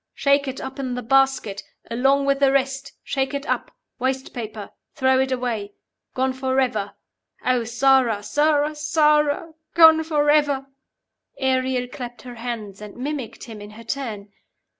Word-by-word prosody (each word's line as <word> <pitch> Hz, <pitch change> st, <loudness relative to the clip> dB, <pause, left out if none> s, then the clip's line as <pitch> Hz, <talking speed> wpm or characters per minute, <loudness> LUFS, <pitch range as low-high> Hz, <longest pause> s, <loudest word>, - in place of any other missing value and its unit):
Shake 280 Hz, 0 st, +2 dB
it 265 Hz, 0 st, -4 dB
up 265 Hz, +1 st, -7 dB
in 255 Hz, -2 st, -2 dB
the 250 Hz, -, -4 dB
basket. 270 Hz, -5 st, +2 dB, 0.3 s
Along 270 Hz, +4 st, +2 dB
with 275 Hz, 0 st, +2 dB
the 275 Hz, -1 st, +4 dB
rest. 270 Hz, 0 st, -1 dB
Shake 270 Hz, 0 st, -1 dB
it 280 Hz, 0 st, -4 dB
up. -, -, -1 dB, 0.3 s
Waste 260 Hz, +1 st, -2 dB
paper. 215 Hz, -4 st, -6 dB, 0.2 s
Throw 260 Hz, -2 st, +3 dB
it 265 Hz, 0 st, +1 dB
away. 235 Hz, -5 st, -2 dB, 0.4 s
Gone 260 Hz, 0 st, +1 dB
forever. 260 Hz, -5 st, -1 dB, 0.5 s
Oh, 250 Hz, -2 st, +2 dB
Sara, 240 Hz, -3 st, +3 dB
Sara, 295 Hz, +3 st, +2 dB
Sara! 300 Hz, +1 st, +2 dB, 0.2 s
Gone 320 Hz, -1 st, +8 dB
forever.'" 295 Hz, -3 st, +2 dB, 0.7 s
Ariel 260 Hz, -1 st, +1 dB
clapped 245 Hz, -2 st, -8 dB
her 250 Hz, -1 st, -8 dB
hands, 225 Hz, -4 st, -6 dB
and 210 Hz, 0 st, -10 dB
mimicked 270 Hz, -2 st, -5 dB
him 220 Hz, -4 st, -9 dB
in 205 Hz, -, -9 dB
her 215 Hz, +2 st, -12 dB
turn. 225 Hz, -5 st, -5 dB
265 Hz, 145 wpm, -23 LUFS, 240-280 Hz, 0.7 s, Gone